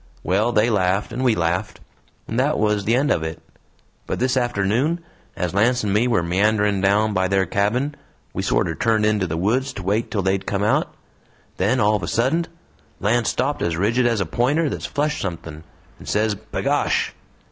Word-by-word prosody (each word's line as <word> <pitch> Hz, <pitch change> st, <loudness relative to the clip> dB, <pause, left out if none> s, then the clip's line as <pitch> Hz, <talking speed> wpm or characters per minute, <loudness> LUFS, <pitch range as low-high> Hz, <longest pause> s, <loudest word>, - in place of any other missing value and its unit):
Well, 105 Hz, +6 st, +1 dB
they 115 Hz, +1 st, +2 dB
laughed, 95 Hz, +1 st, 0 dB
and 125 Hz, +3 st, -2 dB
we 120 Hz, -4 st, +3 dB
laughed 90 Hz, +5 st, -1 dB, 0.5 s
and 115 Hz, -, -2 dB
that 145 Hz, +4 st, +2 dB
was 105 Hz, -2 st, +1 dB
the 115 Hz, -, +3 dB
end 140 Hz, +3 st, +2 dB
of -, -, +1 dB
it. 80 Hz, 0 st, -5 dB, 0.7 s
But -, -, -2 dB
this 130 Hz, +1 st, +1 dB
afternoon, 120 Hz, -, +1 dB, 0.4 s
as 90 Hz, -1 st, -2 dB
Lance 120 Hz, +5 st, +2 dB
and 100 Hz, -2 st, 0 dB
me 110 Hz, +4 st, +3 dB
were 115 Hz, -8 st, +2 dB
meandering 100 Hz, +3 st, +1 dB
down 105 Hz, +2 st, +2 dB
by 95 Hz, -1 st, +1 dB
their 95 Hz, 0 st, +2 dB
cabin, 110 Hz, -, 0 dB, 0.4 s
we -, -, -2 dB
sorter -, -, +1 dB
turned 110 Hz, -2 st, +1 dB
into 105 Hz, -3 st, +1 dB
the 80 Hz, -1 st, -3 dB
woods 120 Hz, +10 st, 0 dB
to 100 Hz, -, -7 dB
wait 105 Hz, +5 st, 0 dB
till 100 Hz, -3 st, -1 dB
they'd 95 Hz, +1 st, 0 dB
come 100 Hz, 0 st, -1 dB
out. 105 Hz, -, +1 dB, 0.7 s
Then 110 Hz, +8 st, +1 dB
all 105 Hz, -1 st, +3 dB
of -, -, -9 dB
a 85 Hz, -, -4 dB
suddent 140 Hz, +9 st, +1 dB, 0.5 s
Lance 115 Hz, +3 st, +1 dB
stopped 145 Hz, +2 st, -1 dB
as 85 Hz, -1 st, -1 dB
rigid 115 Hz, +7 st, +2 dB
as 115 Hz, -3 st, +1 dB
a 95 Hz, -, 0 dB
pointer 140 Hz, -, +1 dB
that's -, -, -4 dB
flushed 150 Hz, 0 st, -1 dB
somethin', 80 Hz, -4 st, -6 dB, 0.4 s
and -, -, -9 dB
says, 105 Hz, 0 st, +1 dB
'B'gosh!' 110 Hz, +2 st, -1 dB
105 Hz, 190 wpm, -22 LUFS, 95-120 Hz, 0.7 s, we